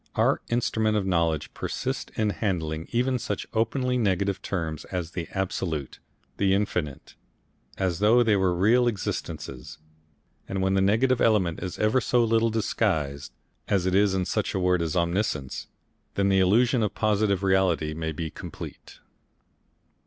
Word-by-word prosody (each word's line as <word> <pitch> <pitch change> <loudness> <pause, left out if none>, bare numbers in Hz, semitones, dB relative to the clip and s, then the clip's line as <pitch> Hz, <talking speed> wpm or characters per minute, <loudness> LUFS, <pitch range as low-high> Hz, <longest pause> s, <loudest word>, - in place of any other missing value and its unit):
Our - - +2
instrument 110 -2 +1
of 100 - -1
knowledge 85 -4 0
persists - - -4
in 105 -1 +1
handling 80 -7 -2
even 125 +1 +1
such - - -3
openly 125 +3 0
negative 100 -2 0
terms 80 -5 -3
as 90 -3 -4
the 85 -2 -4
Absolute, 90 -7 -3 0.4
the 95 -1 +3
Infinite, 90 -8 -2 0.6
as 90 -3 -1
though 115 +4 +5
they 110 -3 +3
were 95 -2 +2
real 115 +7 +4
existences, 75 - -4 0.7
and 95 - -2
when 95 0 +1
the 95 - +3
negative 115 +6 +3
element 100 -7 +2
is 95 0 -5
ever 110 +5 +2
so 120 -1 +2
little 115 0 +2
disguised, 80 -10 -1 0.4
as 95 -3 +1
it 95 - +1
is 100 0 +3
in 95 -1 0
such - - -1
a - - +1
word 90 -1 +2
as 80 +1 -2
Omniscience, 85 -6 -1 0.5
then 100 0 +2
the 95 0 +4
illusion 115 +6 +3
of 105 -3 -1
positive 105 -3 +1
reality 95 -5 +2
may 80 0 -3
be 80 0 -4
complete. - - -10
95 Hz, 150 wpm, -26 LUFS, 85-110 Hz, 0.7 s, though